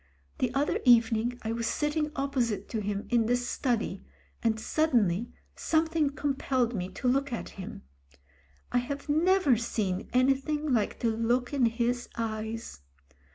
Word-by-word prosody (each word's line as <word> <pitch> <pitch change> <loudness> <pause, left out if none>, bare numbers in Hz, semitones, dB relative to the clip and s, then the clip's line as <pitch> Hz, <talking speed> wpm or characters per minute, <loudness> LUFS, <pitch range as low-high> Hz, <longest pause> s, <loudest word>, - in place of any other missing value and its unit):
The 250 - +1
other 285 +2 +1
evening 235 -1 +4
I 220 - -2
was 230 0 -2
sitting 300 0 0
opposite 265 -6 -1
to 220 - -2
him 205 0 -3
in 235 -2 +3
the 245 - +3
study, 240 -5 -1 0.4
and 225 -1 +1
suddenly 235 - +1 0.2
something 320 -2 +1
compelled 270 -4 0
me 185 -4 -3
to 255 - -3
look 275 +2 +2
at 235 - -4
him. 190 - -8 0.9
I 245 - +3
have 280 +4 -5
never 320 -3 +4
seen 205 -4 -2
any 255 +2 +4
thing 295 +1 -2
like 220 -4 0
the 235 - +2
look 240 +3 0
in 260 -4 +3
his 240 +1 -1
eyes. 220 - -4
245 Hz, 150 wpm, -29 LUFS, 225-280 Hz, 0.9 s, evening